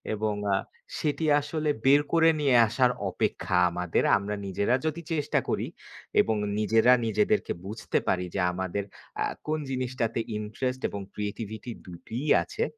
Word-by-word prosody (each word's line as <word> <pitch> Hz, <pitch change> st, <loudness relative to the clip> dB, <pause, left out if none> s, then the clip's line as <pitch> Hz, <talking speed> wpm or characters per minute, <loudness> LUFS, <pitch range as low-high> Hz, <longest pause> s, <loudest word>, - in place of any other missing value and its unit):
এবং 105 Hz, 0 st, -1 dB, 0.2 s
আ -, -, +3 dB, 0.4 s
সেটি 155 Hz, +1 st, -1 dB, 0.2 s
আসলে 150 Hz, +1 st, -2 dB, 0.2 s
বের 140 Hz, +2 st, +7 dB
করে 165 Hz, -1 st, +6 dB
নিয়ে 140 Hz, -4 st, +3 dB
আসার 125 Hz, +3 st, +3 dB, 0.2 s
অপেক্ষা -, -, -1 dB, 0.2 s
আমাদের। 90 Hz, -1 st, 0 dB
আমরা 100 Hz, +1 st, -3 dB
নিজেরা 100 Hz, +5 st, +1 dB
যদি 155 Hz, +2 st, -1 dB
চেষ্টা 150 Hz, -2 st, +1 dB
করি -, -, 0 dB, 0.5 s
এবং 110 Hz, -, 0 dB, 0.2 s
নিজেরা 110 Hz, +3 st, +5 dB
নিজেদেরকে 210 Hz, -, +1 dB
বুঝতে 105 Hz, +3 st, -2 dB
পারি 90 Hz, -1 st, +1 dB
যে, -, -, 0 dB
আমাদের 95 Hz, +2 st, -2 dB, 0.4 s
আ -, -, +1 dB, 0.2 s
কোন 155 Hz, 0 st, 0 dB
জিনিসটাতে 125 Hz, -3 st, -1 dB, 0.2 s
ইন্টারেস্ট 125 Hz, +5 st, -3 dB
এবং 100 Hz, -, -5 dB
ক্রিয়েটিভিটি 105 Hz, +2 st, -5 dB
দুটোই 110 Hz, -, -6 dB, 0.2 s
আছে। 420 Hz, +2 st, -3 dB
115 Hz, 140 wpm, -27 LUFS, 105-145 Hz, 0.5 s, বের